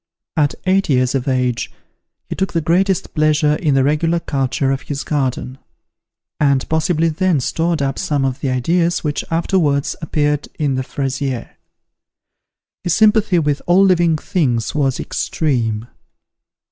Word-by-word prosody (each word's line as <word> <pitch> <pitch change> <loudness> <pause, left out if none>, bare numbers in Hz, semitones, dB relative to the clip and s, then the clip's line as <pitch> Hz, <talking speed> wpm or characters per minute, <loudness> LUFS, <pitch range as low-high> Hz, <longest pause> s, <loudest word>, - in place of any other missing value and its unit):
At 145 -3 +1
eight 190 0 +2
years 130 -2 +2
of 135 -1 -2
age, 125 -2 0 0.6
he - - -4
took 190 - -2
the 165 - +2
greatest 185 +4 +1
pleasure 155 -1 +2
in 150 -5 +1
the 135 - +3
regular 165 +4 +1
culture 135 -3 -1
of 135 -1 -2
his 140 +1 -5
garden; 130 -2 -2 0.8
and 140 -3 +2
possibly 160 +1 +1
then 165 0 +1
stored 165 +3 -1
up 135 0 -2
some 150 -7 0
of 135 0 -2
the 135 - -2
ideas 165 +7 +1
which 150 -2 -2
afterwards 165 -4 +1
appeared 150 -2 0
in 145 -3 0
the 130 - -1
"Fraisier." 135 -2 -3 1.3
His 175 - +1
sympathy 215 -3 +4
with 150 -3 0
all 185 +3 +5
living 175 -4 +3
things 130 -9 -1
was 135 -3 0
extreme. 115 -8 -1
150 Hz, 145 wpm, -18 LUFS, 135-170 Hz, 1.3 s, all